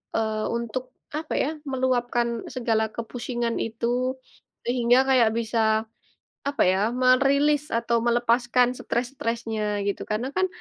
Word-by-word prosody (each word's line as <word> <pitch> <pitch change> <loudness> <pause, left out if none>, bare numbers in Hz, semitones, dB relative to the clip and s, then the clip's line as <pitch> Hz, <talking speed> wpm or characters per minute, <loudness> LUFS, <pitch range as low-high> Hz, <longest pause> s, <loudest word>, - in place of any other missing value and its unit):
eee, 220 -1 0 0.2
untuk 235 +2 -3 0.3
apa 315 0 -4
ya - - 0 0.2
meluapkan 245 -2 +1 0.3
segala 230 -3 +1
kepusingan 235 0 -3
itu, 225 +1 -4 0.8
sehingga 240 0 +3
kayak 250 -4 +5
bisa, 230 0 -1 0.9
apa 285 - +1
ya 190 - +1 0.2
merilis 275 +3 +4
atau 235 0 +1
melepaskan 240 +1 +3
stres-stresnya 230 -3 -2 0.2
gitu 200 - -1
karena 220 +5 -1
kan, 375 0 +3
240 Hz, 115 wpm, -25 LUFS, 230-255 Hz, 0.9 s, kayak